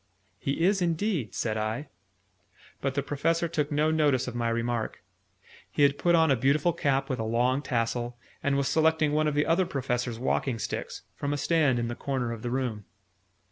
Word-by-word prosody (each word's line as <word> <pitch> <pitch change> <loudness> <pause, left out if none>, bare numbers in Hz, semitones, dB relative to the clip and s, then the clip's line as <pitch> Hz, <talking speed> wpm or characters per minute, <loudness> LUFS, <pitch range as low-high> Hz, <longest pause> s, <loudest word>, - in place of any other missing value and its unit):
"He 140 +4 -1
is 195 0 +3
indeed," 170 - -1
said 110 -2 -1
I. 110 +7 -3 0.9
But 135 -1 -1
the 140 - 0
Professor 165 +4 0
took 155 -2 -1
no 150 +2 +2
notice 145 -6 +2
of 125 - -4
my 120 -1 -1
remark. 115 -1 -2 0.7
He 145 - +1
had 140 0 +3
put 175 -1 +4
on 160 -3 +4
a - - +5
beautiful 140 +7 +2
cap 135 -4 0
with 130 - -2
a - - -1
long 120 +4 +1
tassel, 120 -2 -2 0.2
and 140 0 +1
was 140 -1 +1
selecting 160 -1 +3
one 155 +1 +2
of 150 - 0
the 150 - +2
Other 175 +2 +2
Professor's 125 -3 -2
walking 130 0 0
sticks, 110 - -5
from 145 0 -2
a - - -1
stand 145 -3 +2
in 120 0 -1
the 120 - -3
corner 125 -2 -2
of 115 -2 -6
the 120 - -3
room. 120 -5 -2
140 Hz, 195 wpm, -28 LUFS, 120-155 Hz, 0.9 s, a